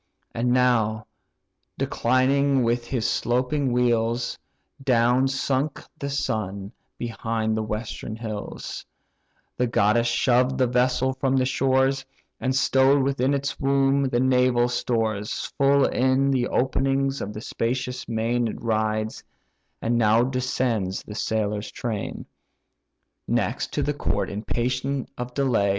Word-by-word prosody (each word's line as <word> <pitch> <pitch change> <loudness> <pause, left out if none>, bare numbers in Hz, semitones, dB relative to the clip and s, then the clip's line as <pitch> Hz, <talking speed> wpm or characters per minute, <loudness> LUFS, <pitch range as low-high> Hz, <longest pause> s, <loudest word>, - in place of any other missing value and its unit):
And 120 +2 0
now, 115 -4 +2 0.7
declining 135 +2 +2
with 120 +1 0
his 120 -4 -1
sloping 130 +3 0
wheels, 120 -1 +1 0.4
Down 125 +1 +3
sunk 135 +2 -1 0.2
the 140 - -3
sun 100 -7 -2 0.3
behind 115 -1 -2
the 110 - -1
western 110 0 -4
hills 110 -2 -6 0.7
The 125 - +1
goddess 115 +1 +2
shoved 125 +2 +2
the 130 - +3
vessel 125 +1 +1
from 135 0 0
the 130 - +2
shores, 135 +1 +2 0.4
And 130 0 -1
stow'd 135 0 +4
within 135 0 +1
its 140 +1 -3
womb 135 0 +2
the 120 -2 0
naval 125 -1 +3
stores, 110 -4 -1
Full 140 0 +5
in 130 +2 +2
the 125 -2 +1
openings 135 +1 0
of 100 - -4
the 105 - -7
spacious 125 +3 -3
main 115 +1 0
It - - -5
rides; 110 -1 -1 0.6
and 120 +1 +1
now 110 +1 +4
descends 125 -6 -1
the 105 - -9
sailor 105 -1 -1
train, 110 0 -5 1.0
Next, - - -1
to - - 0
the - - 0
court, - - -1
impatient 125 +6 -2
of 125 0 -6
delay. 125 -8 +2
125 Hz, 125 wpm, -24 LUFS, 115-130 Hz, 1.0 s, Full